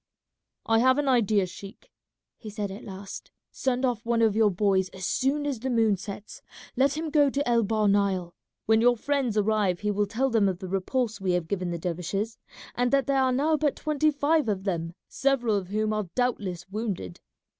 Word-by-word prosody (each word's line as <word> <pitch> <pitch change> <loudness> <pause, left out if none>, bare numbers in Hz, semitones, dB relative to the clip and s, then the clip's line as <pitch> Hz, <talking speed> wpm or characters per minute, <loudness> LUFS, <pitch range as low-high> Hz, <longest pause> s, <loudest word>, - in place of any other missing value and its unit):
"I 225 0 +3
have 260 +2 +4
an 290 -1 0
idea, 215 -6 +3
sheik," 195 - -12 0.5
he 220 - -8
said 205 -1 -4
at 200 - -9
last. 195 0 -9 0.2
"Send 260 0 -1
off 240 -3 -1
one 230 0 +1
of 220 -2 +3
your 220 -1 +4
boys 190 -1 +1
as 190 -1 -7
soon 280 +7 0
as 280 -5 -2
the 260 +3 -3
moon 225 -4 +3
sets, 200 +2 -9 0.3
let 275 +3 +2
him 315 -1 -3
go 290 -2 +4
to 280 +1 -2
El 235 -1 +3
Bahr 215 0 +1
Nile. 195 -3 +1 0.3
When 220 0 +4
your 245 0 +4
friends 265 -3 -1
arrive 205 -4 +1
he 210 0 0
will 205 0 0
tell 250 +6 0
them 215 -4 +3
of 185 - -3
the 190 0 -7
repulse 210 +4 -2
we 185 -2 +1
have 175 -2 -1
given 185 -1 -2
the 170 - -3
dervishes, 180 +6 -3 0.3
and 245 0 +1
that 275 -1 +3
there 275 -1 +2
are 260 -1 +2
now 300 +5 +2
but 295 -2 0
twenty 305 0 +1
five 295 -2 +1
of 195 -2 -1
them, 170 -3 -3
several 255 -5 +1
of 195 -3 -2
whom 215 +2 -1
are 210 -4 -2
doubtless 200 -9 -1
wounded. 195 - -4
215 Hz, 205 wpm, -26 LUFS, 195-260 Hz, 0.5 s, have